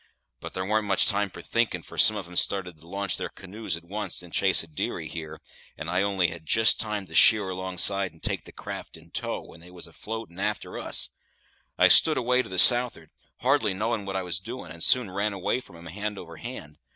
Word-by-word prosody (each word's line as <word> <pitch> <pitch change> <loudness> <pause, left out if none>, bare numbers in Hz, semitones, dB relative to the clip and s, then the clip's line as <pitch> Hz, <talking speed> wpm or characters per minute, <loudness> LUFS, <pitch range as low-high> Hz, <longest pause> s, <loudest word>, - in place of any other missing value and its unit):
But - - -8
there 95 - -2
warn't 105 +1 0
much 95 -1 +4
time 100 0 +2
for - - -10
thinkin', 115 -1 0
for - - -12
some 110 - +5
of 100 -4 -5
'em 90 - -12
started 90 -3 +1
to 85 - -16
launch 100 0 -2
their - - -4
canoes 95 -1 -5
at 85 - -14
once't 100 +1 -6
in 90 - -13
chase 95 -1 +2
of 80 -2 -17
dearie - - -3
here, 80 -2 -8 0.4
and 80 +1 -5
I 90 +1 +2
only 95 -3 +1
had 80 -1 -9
jist 110 +8 +3
time 105 -3 -2
to 80 - -14
sheer 105 +3 +6
alongside 95 +1 +2
and 80 - -23
take - - -1
the - - -11
craft - - -8
in - - -18
tow, - - -3
when 85 - -15
they 85 +2 -15
was 90 -1 -10
afloat 110 +5 -7
and 85 - -9
a'ter - - -3
us. - - +2 0.7
I - - +6
stood - - +7
away 125 +1 +2
to - - -10
the 95 - -5
south'ard, 120 -6 +5 0.3
hardly 125 -6 +2
knowing 110 0 -2
what 95 - -4
I 95 - -1
was 90 -2 -2
doin', 110 -3 -8
and 85 0 -4
soon 125 -7 +2
ran 100 +2 -1
away 100 +5 -1
from 85 - -14
'em 85 - -13
hand 105 +5 -5
over 85 -3 -10
hand. 75 - -9
95 Hz, 235 wpm, -26 LUFS, 85-105 Hz, 0.7 s, stood